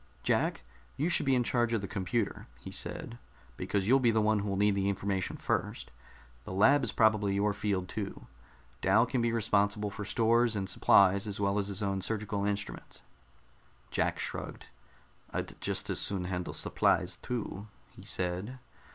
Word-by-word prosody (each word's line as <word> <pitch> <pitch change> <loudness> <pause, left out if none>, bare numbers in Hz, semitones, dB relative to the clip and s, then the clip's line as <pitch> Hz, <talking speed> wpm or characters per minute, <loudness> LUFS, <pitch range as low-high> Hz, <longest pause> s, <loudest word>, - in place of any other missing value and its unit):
"Jack, - - +1 0.3
you 155 +5 +1
should 170 - 0
be 135 - +4
in 125 - +2
charge 120 -1 +1
of 110 - +1
the 100 - -4
computer," 105 +2 -2
he - - -9
said, 120 0 -4 0.4
"because 100 +8 -1
you'll 130 +3 +6
be 120 -3 +3
the 110 -1 +3
one 110 0 +3
who'll 100 -1 -2
need 105 +1 +3
the 100 0 0
information 95 -1 -2
first. - - -2 0.5
The - - -8
lab 130 +9 +5
is 120 - -1
probably 105 -3 +3
your 105 +1 +2
field 100 -3 -1
too. 100 0 -5 0.6
Dal 105 +5 +4
can 125 0 -1
be 115 0 +1
responsible 105 -2 +1
for 105 +1 -6
stores 115 +1 +2
and 95 -2 -2
supplies 100 +2 +4
as 100 -1 -4
well 100 0 +1
as 100 - -1
his 100 0 -4
own 100 -1 -1
surgical 105 -1 -2
instruments." 105 0 -5 0.9
Jack - - 0
shrugged. - - -5 0.6
"I'd - - -5
just - - -2
as - - -1
soon 95 -3 -1
handle 90 -1 -3
supplies, - - +1
too," 110 -4 -5 0.2
he - - -14
said. 95 +7 -2
105 Hz, 170 wpm, -31 LUFS, 100-115 Hz, 0.9 s, you'll